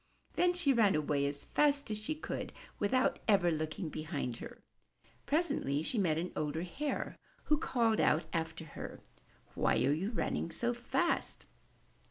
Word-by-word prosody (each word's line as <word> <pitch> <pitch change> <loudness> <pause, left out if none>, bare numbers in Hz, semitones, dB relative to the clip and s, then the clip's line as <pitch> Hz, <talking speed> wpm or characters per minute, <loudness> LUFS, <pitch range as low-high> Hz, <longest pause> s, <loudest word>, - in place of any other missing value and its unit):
'' - - -37
Then 355 0 +4
she 345 -6 +3
ran 215 -7 +4
away 145 -2 +1
as 140 0 -4
fast 285 -4 +2
as 210 - 0
she 215 +9 -2
could, 310 - -5 0.3
without 255 +7 +2
ever 195 -5 +4
looking 155 +2 -2
behind 150 -6 -3
her. - - -10 0.6
Presently 280 - +1
she 225 - 0
met 165 -6 +2
an 175 +2 -2
older 155 +2 -1
Hare, 285 +12 -3 0.2
who 300 - +3
called 230 -7 +2
out 155 - +3
after 160 -1 -2
her, 150 - -8 0.5
''Why - - +2
are 140 - +4
you 180 +7 -1
running 220 -6 -1
so 235 +9 -1
fast?'' 245 +8 -1
190 Hz, 160 wpm, -33 LUFS, 155-260 Hz, 0.6 s, Then